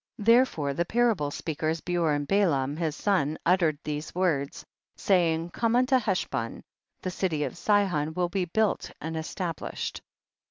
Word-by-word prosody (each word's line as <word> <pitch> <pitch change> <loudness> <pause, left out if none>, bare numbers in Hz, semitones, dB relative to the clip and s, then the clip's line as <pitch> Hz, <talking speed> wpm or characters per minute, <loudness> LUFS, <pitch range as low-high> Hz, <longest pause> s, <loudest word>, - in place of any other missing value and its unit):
19. 210 - -7
Therefore 165 - +2
the 170 - 0
parable 225 -8 +2
speak 155 +1 -5
ers 160 +1 0
Beor 170 -2 0
and 145 0 -2
Balaam 150 -9 +2
his 160 -2 -2
son 155 -7 +1
uttered 170 -4 +3
these 150 +1 -5
words, 160 -7 0 0.3
saying, 170 -3 +1
come 230 +3 +1
unto 255 +1 +4
Heshbon, 185 - -2 0.4
the 185 - -2
city 170 -5 -1
of - - -4
Sihon 175 -6 +1
will 180 -1 0
be 190 -1 -1
built 215 +4 0
and 160 +1 -5
established. 165 +1 -4
170 Hz, 155 wpm, -27 LUFS, 150-195 Hz, 0.4 s, unto